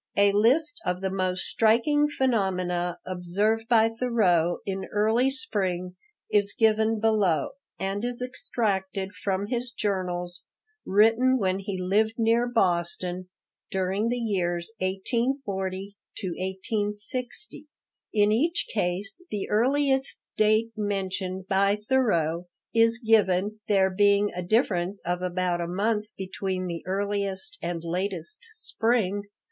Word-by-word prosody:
A 200 Hz, 0 st, +5 dB
list 300 Hz, +12 st, +3 dB
of 180 Hz, +1 st, -2 dB
the 190 Hz, -1 st, -1 dB
most 185 Hz, -1 st, -1 dB
striking 250 Hz, +7 st, +3 dB
phenomena 185 Hz, -10 st, 0 dB
observed 200 Hz, +5 st, 0 dB
by 225 Hz, -2 st, +5 dB
Thoreau 215 Hz, -8 st, +2 dB
in 195 Hz, -1 st, -3 dB
early 220 Hz, +5 st, +3 dB
spring 190 Hz, -9 st, -2 dB, 0.4 s
is 205 Hz, -1 st, +2 dB
given 220 Hz, 0 st, +3 dB
below, 205 Hz, -9 st, +2 dB, 0.3 s
and 195 Hz, +2 st, -2 dB
is 245 Hz, 0 st, +2 dB
extracted 200 Hz, -7 st, -2 dB
from 195 Hz, -1 st, -2 dB
his 245 Hz, +2 st, -2 dB
journals, 180 Hz, -5 st, -2 dB, 0.5 s
written 225 Hz, +6 st, +4 dB
when 190 Hz, -4 st, 0 dB
he 195 Hz, -1 st, -4 dB
lived 210 Hz, +5 st, +1 dB
near 230 Hz, +1 st, +3 dB
Boston, 180 Hz, -4 st, 0 dB, 0.4 s
during 190 Hz, +4 st, 0 dB
the 245 Hz, -, 0 dB
years 180 Hz, -5 st, -1 dB
1840 195 Hz, -1 st, -2 dB, 0.2 s
to 190 Hz, -, -4 dB
1860. 205 Hz, -, -4 dB, 0.4 s
In 210 Hz, -1 st, +3 dB
each 320 Hz, +10 st, +1 dB
case 200 Hz, -, -1 dB
the 205 Hz, -2 st, -3 dB
earliest 265 Hz, +4 st, +2 dB, 0.2 s
date 215 Hz, +2 st, +3 dB
mentioned 190 Hz, -2 st, -3 dB
by 200 Hz, +1 st, +3 dB
Thoreau 195 Hz, -8 st, +1 dB, 0.3 s
is 230 Hz, 0 st, +4 dB
given, 215 Hz, -3 st, +2 dB
there 190 Hz, -2 st, +3 dB
being 205 Hz, +1 st, +3 dB
a 180 Hz, -, -3 dB
difference 190 Hz, -1 st, +1 dB
of 175 Hz, +1 st, -1 dB
about 180 Hz, -1 st, -1 dB
a 170 Hz, -, -2 dB
month 210 Hz, +4 st, 0 dB
between 190 Hz, -1 st, -3 dB
the 170 Hz, -2 st, -4 dB
earliest 200 Hz, -, -2 dB
and 170 Hz, -1 st, -3 dB
latest 175 Hz, 0 st, -3 dB
spring. 225 Hz, -, 0 dB
200 Hz, 120 wpm, -26 LUFS, 185-225 Hz, 0.5 s, A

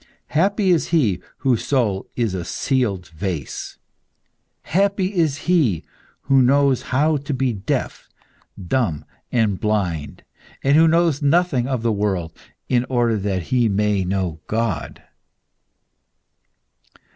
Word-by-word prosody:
Happy 195 Hz, +4 st, +2 dB
is 170 Hz, -, +2 dB
he 115 Hz, -, +1 dB, 0.2 s
whose 130 Hz, -4 st, +1 dB
soul 110 Hz, -9 st, 0 dB
is 115 Hz, -5 st, 0 dB
a 90 Hz, -2 st, -3 dB
sealed 105 Hz, -4 st, -1 dB
vase! 80 Hz, -3 st, -5 dB, 0.9 s
Happy 195 Hz, +1 st, +1 dB
is 160 Hz, -6 st, 0 dB
he 150 Hz, -, +2 dB, 0.4 s
who 135 Hz, 0 st, +3 dB
knows 135 Hz, 0 st, +3 dB
how 150 Hz, +4 st, +1 dB
to 140 Hz, 0 st, -4 dB
be 130 Hz, -1 st, 0 dB
deaf, 100 Hz, -2 st, -3 dB, 0.6 s
dumb, 85 Hz, -, 0 dB, 0.3 s
and 110 Hz, -6 st, +1 dB
blind, 90 Hz, -8 st, -2 dB, 0.4 s
and 140 Hz, +1 st, +4 dB
who 165 Hz, +1 st, +6 dB
knows 165 Hz, -2 st, +2 dB
nothing 145 Hz, -4 st, +2 dB
of 130 Hz, -4 st, -2 dB
the 115 Hz, -, +2 dB
world, 95 Hz, -6 st, -2 dB, 0.3 s
in 120 Hz, -1 st, +2 dB
order 120 Hz, -3 st, +1 dB
that 95 Hz, -3 st, -2 dB
he 120 Hz, -3 st, +3 dB
may 105 Hz, -1 st, +1 dB
know 90 Hz, -3 st, -2 dB
God!" 110 Hz, -8 st, -2 dB
120 Hz, 120 wpm, -21 LUFS, 100-145 Hz, 0.9 s, who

